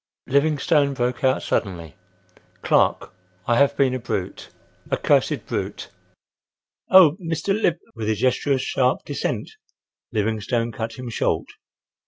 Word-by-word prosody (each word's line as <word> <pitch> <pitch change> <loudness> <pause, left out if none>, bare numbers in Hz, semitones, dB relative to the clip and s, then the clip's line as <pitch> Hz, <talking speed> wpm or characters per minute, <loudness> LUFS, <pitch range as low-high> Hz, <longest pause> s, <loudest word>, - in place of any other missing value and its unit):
Livingstone 145 0 +2
broke 125 0 -2
out 130 0 +2
suddenly: 85 - -2 0.7
"Clark, - - +2 0.3
I 120 - +2
have 140 0 +3
been 135 -2 +3
a 130 - -2
brute, 95 -5 -4 0.4
a - - 0
cursed - - +1
brute!" - - -4 1.0
"Oh! 180 -4 +7
Mr. 165 +2 -3
Liv—!" 185 -5 +1 0.2
With 110 -3 -4
a 110 - +2
gesture 130 +5 +1
of 130 - 0
sharp 130 -1 0
dissent - - -3 0.6
Livingstone 110 +2 -1
cut 115 0 -5
him 125 -1 -7
short. - - 0
130 Hz, 130 wpm, -22 LUFS, 115-145 Hz, 1.0 s, Oh